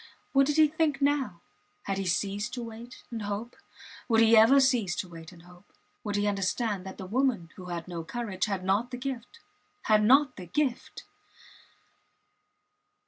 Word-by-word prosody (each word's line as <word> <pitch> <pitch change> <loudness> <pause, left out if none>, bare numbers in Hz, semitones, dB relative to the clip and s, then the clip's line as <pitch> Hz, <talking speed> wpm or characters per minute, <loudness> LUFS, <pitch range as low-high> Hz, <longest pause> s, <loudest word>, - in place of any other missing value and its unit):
What 275 0 +4
did 295 +1 0
he 310 -1 +7
think 305 -1 0
now? 280 -11 0 0.4
Had 195 -1 -2
he 195 - -3
ceased 205 +6 -1
to 245 - -5
wait 230 +2 -10
and 230 -2 -4
hope? 205 +4 -5 0.5
Would 225 -1 +4
he 225 0 +6
ever 225 +6 +7
cease 245 -9 +2
to - - -4
wait 165 -1 -11
and 170 -2 -16
hope? 180 +2 -18 0.3
Would 205 -2 -3
he 205 0 +1
understand 200 0 -1
that 190 - -8
the 190 - -7
woman, 225 -5 0
who 185 - -10
had 175 -1 -5
no 170 -2 -5
courage, 205 0 -3
had 195 -4 -3
not 205 +6 +1
the 250 - -6
gift 260 - -6 0.4
had 215 -1 +3
not 265 +3 +4
the 180 -2 -8
gift! 265 - -2
220 Hz, 175 wpm, -28 LUFS, 190-255 Hz, 0.5 s, he